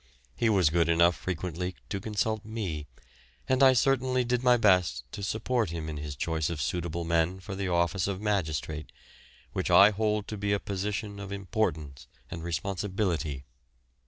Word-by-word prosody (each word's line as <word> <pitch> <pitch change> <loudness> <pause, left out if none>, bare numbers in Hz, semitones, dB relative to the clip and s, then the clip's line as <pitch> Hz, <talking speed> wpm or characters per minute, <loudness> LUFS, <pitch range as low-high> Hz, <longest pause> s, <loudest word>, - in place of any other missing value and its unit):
He 115 - +2
was 95 -8 +4
good 85 0 +2
enough 85 +1 +4
frequently 90 0 -4
to 100 - -2
consult 110 +1 -1
me, 100 -9 -4 0.6
and 130 +1 +2
I 135 -1 +8
certainly 130 0 +2
did 120 0 0
my 125 -1 +5
best 90 - +3
to - - -7
support 110 +1 0
him 80 -1 -5
in 75 -1 -5
his 75 -1 -5
choice 80 +1 -1
of 85 -3 -4
suitable 85 +5 -2
men 85 +2 +1
for 95 +1 -7
the 95 0 -3
office 85 +2 +1
of 95 -2 -2
magistrate, 80 -7 -2 0.6
which - - -1
I 100 +2 +8
hold 105 0 0
to 105 - -4
be 100 0 0
a 100 - +1
position 100 +1 -4
of 100 -1 -7
importance 85 - -2 0.2
and 80 0 -6
responsibility. 85 -4 -2
95 Hz, 165 wpm, -28 LUFS, 80-105 Hz, 0.6 s, I